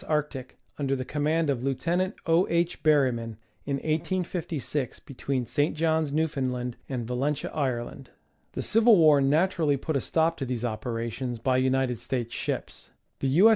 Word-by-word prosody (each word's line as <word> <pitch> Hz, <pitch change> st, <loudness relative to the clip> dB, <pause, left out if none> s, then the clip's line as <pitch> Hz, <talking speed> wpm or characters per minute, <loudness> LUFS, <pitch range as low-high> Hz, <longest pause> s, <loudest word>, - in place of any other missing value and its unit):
Arctic, 150 Hz, -4 st, -2 dB, 0.2 s
under 135 Hz, -1 st, 0 dB
the 130 Hz, -1 st, -4 dB
command 155 Hz, +3 st, 0 dB
of 125 Hz, -3 st, -3 dB
Lieut. 135 Hz, +4 st, -2 dB, 0.4 s
O. 165 Hz, +3 st, +3 dB
H. 170 Hz, +1 st, 0 dB
Berryman, 125 Hz, -7 st, +2 dB, 0.3 s
in 140 Hz, -, 0 dB
1856, 160 Hz, -, -2 dB
between 135 Hz, -1 st, -3 dB
St. 145 Hz, +6 st, 0 dB
Johns, 160 Hz, -2 st, +1 dB
Newfound 145 Hz, -4 st, 0 dB
land, 125 Hz, -1 st, -4 dB
and 125 Hz, -4 st, -3 dB
Yalentia, 135 Hz, +4 st, -1 dB
Ireland. 130 Hz, -2 st, -3 dB, 0.4 s
The -, -, -3 dB
civil 225 Hz, -1 st, +5 dB
war 155 Hz, -4 st, +6 dB
naturally 155 Hz, +1 st, +2 dB
put 155 Hz, +3 st, -3 dB
a 135 Hz, -, +1 dB
stop 165 Hz, +4 st, +1 dB
to 135 Hz, -, -3 dB
these 125 Hz, -1 st, -2 dB
operations 120 Hz, +2 st, -3 dB
by 130 Hz, +3 st, +1 dB
United 130 Hz, -2 st, +1 dB
States 120 Hz, -3 st, -3 dB
ships. -, -, -4 dB, 0.3 s
The 135 Hz, -, 0 dB
U. 175 Hz, +12 st, +6 dB
140 Hz, 155 wpm, -27 LUFS, 125-160 Hz, 0.4 s, war